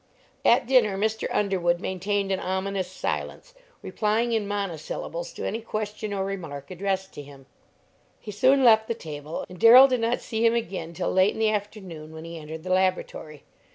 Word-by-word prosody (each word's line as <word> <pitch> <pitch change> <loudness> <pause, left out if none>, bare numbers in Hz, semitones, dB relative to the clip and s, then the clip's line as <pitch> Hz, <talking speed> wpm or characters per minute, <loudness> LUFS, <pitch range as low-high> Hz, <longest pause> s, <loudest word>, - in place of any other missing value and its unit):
At 245 +3 +4
dinner 235 -6 +3
Mr. 220 +2 -1
Underwood 180 -4 +1
maintained 195 +2 -2
an 190 - 0
ominous 190 0 -2
silence, - - -5 0.3
replying 225 +2 0
in 220 -3 0
monosyllables 175 -3 -4
to - - -6
any 225 +3 -3
question 215 -1 -4
or 195 -1 -2
remark 160 -8 -6
addressed 190 +1 -3
to - - -8
him. 140 -1 -14 0.7
He 210 - -8
soon 260 +6 +3
left 220 -2 +6
the 230 - -2
table, 150 -2 -7
and 180 -1 -12
Darrell 250 +6 +9
did 255 -2 0
not 230 +2 0
see 225 -1 -3
him 230 0 +4
again 185 -7 -4
till 175 +1 -2
late 190 +2 +4
in - - -8
the 220 -1 +3
afternoon, 190 -7 -6
when 160 +1 -9
he 165 0 -7
entered 160 +1 -8
the 185 0 -1
laboratory. 185 -5 -1
195 Hz, 180 wpm, -25 LUFS, 175-220 Hz, 0.7 s, Darrell